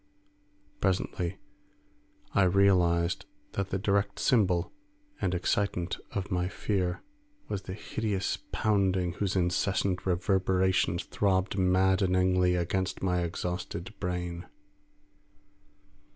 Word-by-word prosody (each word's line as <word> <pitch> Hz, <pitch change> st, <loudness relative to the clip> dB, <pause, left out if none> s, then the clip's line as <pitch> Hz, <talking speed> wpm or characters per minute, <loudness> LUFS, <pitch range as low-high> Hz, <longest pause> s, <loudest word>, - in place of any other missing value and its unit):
Presently 90 Hz, -1 st, -1 dB, 1.0 s
I -, -, +4 dB
realised 95 Hz, -1 st, +3 dB, 0.2 s
that 100 Hz, -1 st, -2 dB
the 95 Hz, -, -1 dB
direct 100 Hz, 0 st, 0 dB
symbol 90 Hz, -8 st, +2 dB, 0.5 s
and 90 Hz, -1 st, +1 dB
excitant 90 Hz, -1 st, 0 dB
of 100 Hz, 0 st, -3 dB
my 90 Hz, 0 st, +1 dB
fear 95 Hz, -2 st, -2 dB, 0.4 s
was 100 Hz, -, -3 dB
the 95 Hz, -, -6 dB
hideous 105 Hz, -2 st, -2 dB
pounding 95 Hz, -4 st, +1 dB
whose 100 Hz, +1 st, -2 dB
incessant 95 Hz, +1 st, 0 dB
reverberations 95 Hz, -1 st, +2 dB
throbbed 95 Hz, -2 st, 0 dB
maddeningly 95 Hz, -1 st, +3 dB
against 90 Hz, +2 st, -1 dB
my 90 Hz, -2 st, +1 dB
exhausted 90 Hz, +2 st, -4 dB
brain. 90 Hz, -1 st, -3 dB
95 Hz, 95 wpm, -29 LUFS, 90-100 Hz, 1.0 s, I